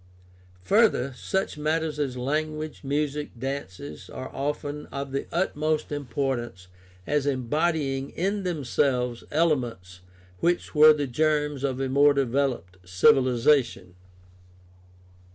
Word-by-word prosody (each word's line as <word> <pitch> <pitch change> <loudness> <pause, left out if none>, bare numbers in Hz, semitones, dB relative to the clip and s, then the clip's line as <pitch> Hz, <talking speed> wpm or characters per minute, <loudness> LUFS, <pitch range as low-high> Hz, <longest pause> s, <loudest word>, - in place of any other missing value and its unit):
Further, 200 - +3
such 190 +1 -2
matters 155 0 -1
as 135 -4 -2
language, 155 +4 -3
music, 145 +1 -1
dances, 95 - -6
are - - -8
often 145 +1 -3
of 140 0 -5
the 135 - -3
utmost 155 -4 -1
importance 125 -8 -3 0.4
as 145 -1 0
embodying 140 +1 0
in 200 +4 -1
themselves 135 -7 -1
elements 120 - -1 0.4
which 175 +1 0
were 155 0 +8
the 150 -1 0
germs 150 +1 0
of 135 -2 -1
a 135 - -1
more 140 +2 +4
developed 125 -9 -1
civi 95 +11 +4
lization. 125 -6 +1
140 Hz, 110 wpm, -26 LUFS, 125-150 Hz, 0.4 s, were